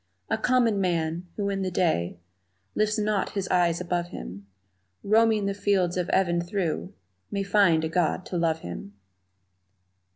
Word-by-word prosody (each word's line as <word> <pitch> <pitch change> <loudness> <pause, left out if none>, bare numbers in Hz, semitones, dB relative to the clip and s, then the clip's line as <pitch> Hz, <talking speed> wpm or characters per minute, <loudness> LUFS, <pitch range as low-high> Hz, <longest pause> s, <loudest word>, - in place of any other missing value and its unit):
A - - +2
common 235 -5 +2
man, 170 -1 -1
who 200 -1 -1
in 195 0 -2
the 190 - -1
day 160 - 0 0.6
Lifts 215 +1 +1
not 210 -2 0
his 195 -2 -2
eyes 175 -2 +2
above 175 -1 -2
him, 100 - -9 0.6
Roaming 220 0 +3
the 200 - 0
fields 195 -3 +1
of 180 -1 -1
even 175 -2 +2
through 175 -2 -3 0.3
May 200 -1 -2
find 195 -5 +3
a - - +1
God 175 +2 0
to - - -6
love 165 -1 +1
him! 95 +3 -8
180 Hz, 155 wpm, -26 LUFS, 170-200 Hz, 0.6 s, Roaming